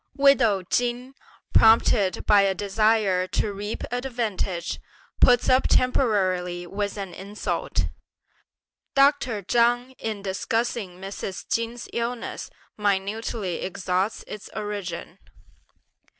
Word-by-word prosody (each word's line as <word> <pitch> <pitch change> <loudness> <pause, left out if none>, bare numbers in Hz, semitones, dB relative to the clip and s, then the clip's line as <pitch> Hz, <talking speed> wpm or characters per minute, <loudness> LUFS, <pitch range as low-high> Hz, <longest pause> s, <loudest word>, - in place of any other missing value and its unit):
Widow 250 -9 +4
Chin, 245 +6 -1 0.4
prompted 220 -3 +4
by 205 -1 +6
a 195 -1 +2
desire 205 -2 +2
to 205 +2 -1
reap 205 +2 -5
advantage, 230 -8 -2 0.4
puts 245 -2 +5
up 255 +1 +4
temporarily 185 -8 +1
with 200 +3 -3
an 195 -3 -5
insult. 200 +4 -2 1.1
Dr. 275 -6 +3
Chang 240 +4 +2
in 215 -3 -4
discussing 200 -1 -2
Mrs. 195 0 -6
Chin's 230 +1 -2
illness 235 0 -3 0.3
minutely 205 -1 -1
exhausts 185 +2 -1
its 210 - -9
origin. 205 -5 -5
210 Hz, 95 wpm, -25 LUFS, 190-235 Hz, 1.1 s, by